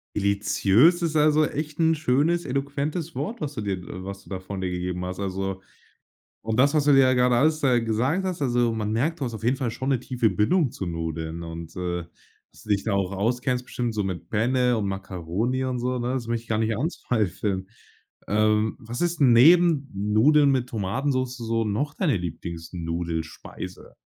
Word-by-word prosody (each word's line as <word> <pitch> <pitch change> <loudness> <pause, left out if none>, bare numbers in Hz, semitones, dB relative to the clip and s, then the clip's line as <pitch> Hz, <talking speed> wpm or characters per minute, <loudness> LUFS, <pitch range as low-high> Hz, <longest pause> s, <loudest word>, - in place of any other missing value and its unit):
Deliziös 105 - +3
ist, 160 -2 -1
also, 155 0 +4
echt 150 +2 -5
'n 160 0 +4
schönes, 155 +4 +1
eloquentes 140 +5 -2
Wort, 225 +1 -4
was 145 -1 -3
du 110 - -4
dir 100 -2 -2 0.3
was 100 0 -7
du - - -17
da 95 -1 -4
von 95 +1 -6
dir 95 - -1
gegeben 90 0 -3
hast. 90 +1 -5
Also 95 -1 -3 0.8
und 110 +1 -3
das, 140 +3 +5
was 150 -2 +3
du 145 - +5
mir 135 - +7
ja 130 -1 +5
grade 125 -1 +3
alles 155 +5 +3
gesagt 125 - +1
hast, 180 -4 -3
also, 120 -3 +2
man 110 -1 -2
merkt, 155 +8 0
du - - -1
hast 120 -2 -4
auf 110 - -7
jeden 125 +3 +2
Fall 130 -4 -2
schon 130 +4 -3
'ne 130 - +1
tiefe 125 -3 0
Bindung 120 - +2
zu 110 -8 -6
Nudeln. 80 0 -4
Und, 80 0 -8
äh, 90 -1 -3 0.5
dass - - -17
du 105 - -11
dich 100 -1 +2
da 110 - 0
auch 100 -1 0
auskennst 125 +5 -1
bestimmt 120 -3 -3
so 105 - 0
mit 90 -3 -5
Penne 125 +2 +2
und 105 - -1
Makkaroni 95 +6 -2
und 130 -1 -2
so, 125 +1 -1
ne? 120 +2 -1
Das 125 -3 -3
möchte 115 0 -2
ich - - -24
gar 110 - 0
nicht 110 0 0
anzweifeln. 100 - -2 0.6
Ähm, 110 +1 +2
was 115 +2 -7
ist 175 -2 0
'n 130 -4 +6
neben 155 +2 +6
Nudeln 110 +9 +4
mit 130 -2 0
Tomatensoße 130 +4 -2 0.2
noch 140 +9 -1
deine 160 - +1
Lieblings-Nudelspeise? 85 -1 -6
115 Hz, 190 wpm, -25 LUFS, 100-140 Hz, 0.8 s, mir